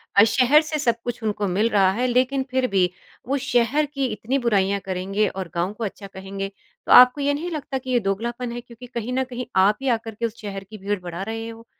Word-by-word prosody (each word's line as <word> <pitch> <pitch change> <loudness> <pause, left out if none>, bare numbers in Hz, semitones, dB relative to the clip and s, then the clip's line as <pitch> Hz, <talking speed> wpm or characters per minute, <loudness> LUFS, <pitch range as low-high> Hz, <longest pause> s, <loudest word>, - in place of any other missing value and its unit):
अ, 200 - +8
शहर 260 +6 +5
से 305 0 -3
सब 235 -5 +2
कुछ 240 -1 -4
उनको 205 -1 -1
मिल 205 +5 +1
रहा 195 -4 +4
है 245 +6 0
लेकिन 255 +2 +1
फिर 260 0 +1
भी 190 -4 +2 0.4
वो 275 +2 +1
शहर 260 +3 +1
की 275 -2 -3
इतनी 245 +3 -2
बुराइयाँ 200 -2 +2
करेंगे 195 +3 0
और 185 -3 -5
गाँव 175 +4 -1
को 230 - -6
अच्छा 200 -1 -5
कहेंगे। 195 0 -6 0.3
तो - - -2
आपको 250 +3 +8
ये 285 +1 +2
नहीं 325 +5 -3
लगता 285 -4 -3
कि 260 0 -8
ये 245 - +4
दोगलापन 235 +5 -3
है 240 0 -5
क्योंकि 240 +1 -13
कहीं 240 0 -4
न 260 +1 +1
कहीं 250 -1 -6
आप 195 +3 +4
ही 270 - -3
आकर 225 -1 -9
के 235 - -2
उस 230 0 -5
शहर 195 -2 -6
की 215 +3 -11
भीड़ 205 0 -2
बढ़ा 175 0 -6
रहे 225 +1 -4
हो। 230 0 -11
230 Hz, 240 wpm, -23 LUFS, 195-255 Hz, 0.4 s, अ